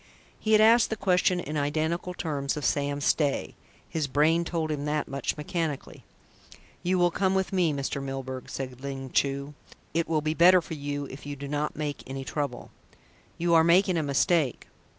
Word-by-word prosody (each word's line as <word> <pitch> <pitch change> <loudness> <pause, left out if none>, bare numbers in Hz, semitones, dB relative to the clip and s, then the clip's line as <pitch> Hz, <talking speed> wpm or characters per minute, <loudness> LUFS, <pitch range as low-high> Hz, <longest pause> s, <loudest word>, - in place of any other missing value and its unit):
He 220 - +1
had 215 - +7
asked 225 +1 +6
the 220 - -1
question 180 -2 +2
in 155 -2 -4
identical 160 +5 -1
terms 145 -5 -2
of 145 - -3
Sam 145 0 0
Stay 145 0 +1 0.3
his 155 -3 -2
brain 155 +5 +3
told 165 -2 -2
him 145 -1 -3
that 150 0 -1
much, 140 +2 -3
mechanically. 155 -1 -4 0.8
"You 185 +1 +1
will 175 -1 +3
come 190 +2 +1
with 190 0 0
me, 180 -4 +3
Mr. 140 -1 -3
Milburgh," 135 -1 -5
said 130 -2 -6
Ling 135 -2 -6
Chu. 140 +1 0 0.4
"It 165 +1 0
will 155 -1 +1
be 155 +1 0
better 180 +3 +7
for 165 - -7
you 145 -1 -4
if 140 +2 -10
you 145 - -4
do 140 0 -7
not 150 +1 -2
make 150 -1 -3
any 135 +1 -5
trouble." 140 -5 -4 0.7
"You 170 0 +1
are 165 -1 +7
making 180 +2 +4
a 165 - +1
mistake." 145 +1 +1
150 Hz, 185 wpm, -27 LUFS, 140-170 Hz, 0.8 s, had